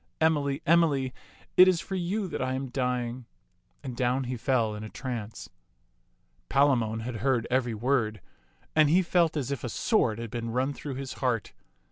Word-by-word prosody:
Emily, 150 -2 +1
Emily, 150 -6 +3 0.4
it 185 - +9
is 185 -2 +3
for 195 - -7
you 190 +3 -1
that 170 - -4
I 130 0 -1
am 135 0 -4
dying 125 -1 -2 0.3
"; 90 +10 -42
and 130 -3 -5
down 125 +2 +1
he 125 0 -3
fell 115 -3 +1
in 105 0 -6
a 110 - -7
trance. 115 -4 -6 1.0
Palamon 120 -6 +2
had 115 0 -4
heard 120 0 +1
every 125 -3 +1
word, 110 -2 0 0.6
and 155 -2 +5
he 180 +4 +4
felt 170 -2 +2
as 140 -2 -2
if 140 -4 -3
a 120 - -2
sword 115 - +1
had 115 -2 -6
been 115 -1 -4
run 130 +4 0
through 140 -1 -6
his 135 0 -5
heart. 125 -5 0
130 Hz, 180 wpm, -28 LUFS, 115-145 Hz, 1.0 s, it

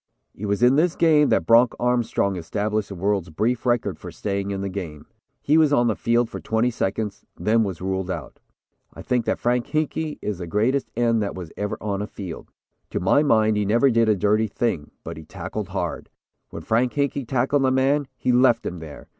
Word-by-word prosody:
"It 105 - -6
was 100 +3 0
in 125 +3 +5
this 170 +2 +2
game 155 -3 +4
that - - +2
Bronc 115 +1 +5
Armstrong 120 -5 +1
established 105 +4 -2
the 100 - -6
world's 95 -1 -1
brief 115 +9 -1
record 120 -1 0
for - - -8
staying 100 -1 -3
in 100 -1 -3
the 100 - -2
game. 90 -6 -6 0.4
He 155 +3 +4
was 155 -2 +4
on 120 -4 +3
the 110 -3 +1
field 120 0 +1
for - - -7
twenty 110 +2 0
seconds 105 -1 -3
then 115 +1 +2
was 95 -5 -4
ruled 95 -1 -2
out. 80 -8 -6 0.6
I - - -9
think 125 -2 0
Frank 120 +1 0
Hinkey 155 0 -2
is 105 -4 -4
the 90 - -5
greatest 120 +9 0
end 115 -1 +2
that 100 - -3
was 90 -4 -8
ever 105 0 -3
on 100 -1 -3
a 105 - -3
field. 95 -6 -8 0.4
To - - -2
my 95 +11 +3
mind 110 -7 +3
he 105 - +1
never 120 +7 +3
did 115 -1 +3
a 105 - +4
dirty 105 +3 +2
thing, 95 -9 -2
but - - -7
he 80 - -9
tackled 75 - -6
hard. - - -4 0.4
When - - -8
Frank 120 +3 +1
Hinkey 140 -3 -1
tackled 135 +3 +1
a 130 - +3
man, 135 +2 +2
he 125 - 0
left 125 -1 +4
him 90 - -4
there. 80 -3 -10
110 Hz, 210 wpm, -23 LUFS, 100-125 Hz, 0.6 s, in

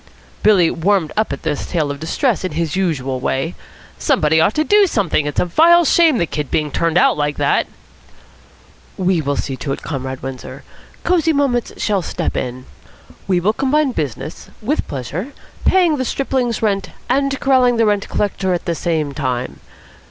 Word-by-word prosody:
Billy 190 -6 +4
warmed 180 -1 +1
up 215 +1 0
at - - -5
this 150 -2 -2
tale 155 -5 0
of 140 - -6
distress 210 - 0
in 185 - -3
his 160 0 -2
usual 140 -9 -1
way. 135 +6 -1 0.5
"Somebody 160 +1 +2
ought 200 - +2
to 310 - +2
do 410 +4 +4
something. 180 - 0
It's 145 - -2
a - - +2
vile 335 - +5
shame 320 -2 +4
the 170 - +1
kid 150 -3 -4
being 150 -2 -1
turned 165 0 0
out 180 - +4
like 145 0 -1
that." - - +1 1.3
"We 185 -3 +1
will 145 -1 -1
see 135 - -3
to 135 +2 -4
it, - - -8
Comrade 130 -3 -5
Windsor. 130 -1 -7 0.4
Cosy 330 -3 +2
Moments 270 -5 0
shall 205 -3 0
step - - -3
in. 125 0 -4 0.6
We 185 -2 +2
will 200 +5 +1
combine 275 +3 +1
business 150 - -5
with 275 +9 -1
pleasure, 150 - -5 0.3
paying 350 -5 +4
the 260 - -1
stripling's 255 -3 -1
rent 200 -2 0 0.2
and 275 +1 0
corralling 255 -3 +3
the 225 - +3
rent 205 -1 0
collector 190 -2 0
at 175 - -5
the 170 - 0
same 160 -4 -1
time. 130 -3 -3
180 Hz, 175 wpm, -18 LUFS, 150-250 Hz, 1.3 s, vile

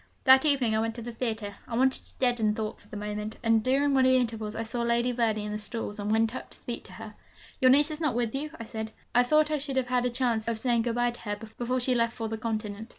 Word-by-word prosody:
That 265 +2 +7
evening 265 -7 +2
I - - +2
went 225 0 -1
to 235 - -6
the 240 - -5
theatre, 225 -3 -3
I 230 - -4
wanted 265 +1 +3
to - - -10
deaden 240 -4 +2
thought 215 -1 -4
for - - -20
the 210 - -8
moment; 210 +1 -4
and 225 -1 +3
during 275 +3 +2
one 265 -1 +4
of 260 - +5
the 260 - +5
intervals 225 -3 -2
I 225 - -2
saw 235 +2 -2
Lady 235 +1 +1
Verney 225 -3 0
in 210 - -4
the 210 - -3
stalls, 210 0 -5
and 205 +1 -2
went 225 +1 +2
up - - -7
to - - -15
speak - - -6
to - - -11
her. - - -9 0.5
'Your 255 - +6
niece 290 +4 +5
is 305 +1 -6
not 295 -7 +1
with 235 -2 0
you?' 290 +3 -3
I - - -5
said; 220 0 -5 0.2
'I 245 - +6
thought 305 +4 +3
I 305 - +1
should 275 -1 -3
have 255 -1 0
had 250 0 +2
a - - 0
chance 240 -3 0
of 230 - +1
of - - -5
saying 240 -1 +2
good 230 0 -1
bye 240 0 +2
to 240 - -6
her 205 -1 -3
before 235 +4 -3
she 255 +1 +2
left 230 -1 +1
for 225 - -4
the 220 0 -4
continent.' 220 -1 -4
235 Hz, 295 wpm, -28 LUFS, 220-255 Hz, 0.5 s, That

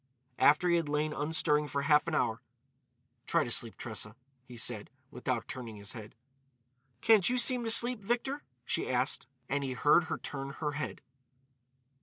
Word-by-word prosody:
After 150 +5 +5
he 170 -1 +4
had 165 -3 -2
lain 150 +1 -1
unstirring 150 0 +2
for 140 0 -2
half 150 +2 +3
an 165 - -1
hour: 115 -6 0 0.9
"Try - - +2
to - - -5
sleep, - - +1
Tressa," 105 +1 -5 0.3
he 125 -2 -12
said, 110 -2 -1 0.2
without 125 -1 -3
turning 120 -4 -7
his 100 +1 -8
head. 110 -3 -10 0.9
"Can't 220 -4 +5
you 250 - 0
seem 250 0 +3
to - - -1
sleep, 235 +1 +6
Victor?" 245 +7 -2 0.2
she - - -2
asked. - - -1 0.2
And 140 +1 -1
he 130 -1 -3
heard 150 +6 +4
her - - -3
turn 135 -1 -6
her 150 0 -3
head. 150 +1 -5
150 Hz, 170 wpm, -31 LUFS, 130-175 Hz, 0.9 s, sleep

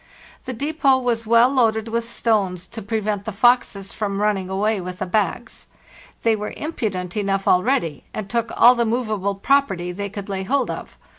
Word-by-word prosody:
The 255 - -4
depot 280 +1 +2
was 235 -3 -1
well 235 +3 +5
loaded 225 -4 +2
with 230 +1 -2
stones 195 -7 0
to 225 +4 -8
prevent 210 -1 -2
the 220 - -3
foxes 200 -3 +2
from 200 -2 -2
running 205 -3 0
away 205 +1 0
with 180 0 -6
the - - -3
bags. 200 +3 -2 0.6
They 225 -1 +3
were 210 0 -5
impudent 200 - -3
enough 195 -2 -1
already, 180 - +2
and 215 -2 -5
took 230 +1 -1
all 245 - +8
the 240 -1 +1
movable 215 -4 -1
property 195 -6 +1
they 200 +3 -5
could 200 0 -7
lay 195 -1 -3
hold 260 +6 0
of. - - -8
215 Hz, 175 wpm, -22 LUFS, 195-235 Hz, 0.6 s, all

